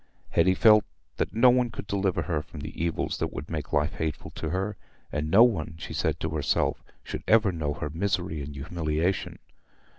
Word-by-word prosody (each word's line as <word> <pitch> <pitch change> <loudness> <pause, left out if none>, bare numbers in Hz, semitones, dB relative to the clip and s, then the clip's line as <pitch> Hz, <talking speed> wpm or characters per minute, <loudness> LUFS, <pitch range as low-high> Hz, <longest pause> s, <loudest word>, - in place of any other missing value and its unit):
Hetty 95 +3 +4
felt 105 0 +6 0.3
that - - -1
no 120 +3 +6
one 125 -1 +2
could 110 - -7
deliver 100 -2 0
her 80 -5 -1
from 75 0 -10
the 80 - -5
evils 85 -2 -1
that - - -1
would 75 - -7
make 75 -3 -4
life 75 0 +1
hateful 80 -3 -4
to 80 - -4
her; 95 +4 -2 0.4
and 75 +1 -2
no 100 +8 +8
one, 80 -9 +1
she - - -7
said - - 0
to 80 - -1
herself, 75 -2 0 0.2
should - - -5
ever 110 -3 +5
know 75 -4 -2
her 75 - -4
misery 90 -2 -1
and 70 +1 -7
humiliation. 80 +4 -1
85 Hz, 190 wpm, -27 LUFS, 75-100 Hz, 0.4 s, no